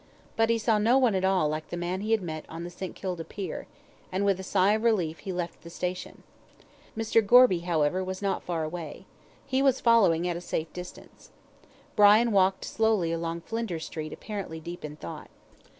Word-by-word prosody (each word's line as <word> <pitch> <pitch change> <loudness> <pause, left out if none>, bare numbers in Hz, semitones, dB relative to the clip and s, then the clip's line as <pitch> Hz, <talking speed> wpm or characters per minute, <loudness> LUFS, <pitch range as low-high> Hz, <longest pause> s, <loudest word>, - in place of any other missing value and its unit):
But 225 0 +2
he 230 - +3
saw 220 -1 +2
no 230 +5 +4
one 250 -5 +3
at 190 -1 0
all 190 -5 +3
like 155 +1 -3
the 175 - -4
man 175 +2 -2
he 215 - -4
had 225 -3 +2
met 155 -2 -5
on 165 +1 -7
the 175 - -6
St. 185 +1 -7
Kilda 180 -3 -4
pier, 195 +3 -6 0.4
and 190 +2 0
with 195 -2 +2
a - - -5
sigh 190 +1 +3
of 215 - 0
relief 185 -9 +1
he 195 - -5
left 175 -1 -4
the 170 - -11
station. 180 +1 -5 0.7
Mr. 225 0 +2
Gorby, 240 -4 +6
however, 170 +1 +1
was 185 0 -4
not 200 -1 -1
far 170 -2 -3
away. 155 -1 -6 0.4
He 265 0 0
was 270 -1 +3
following 195 -8 +4
at 175 - -1
a 170 - -5
safe 160 -2 -4
distance. 180 0 -11 0.7
Brian 215 +3 +6
walked 190 -1 +2
slowly 220 -7 +1
along 165 0 -3
Flinders 200 -7 -4
Street 155 -2 -6
apparently 200 -7 -6
deep 170 +2 -8
in 150 -1 -6
thought. - - -9
185 Hz, 200 wpm, -27 LUFS, 170-215 Hz, 0.7 s, Gorby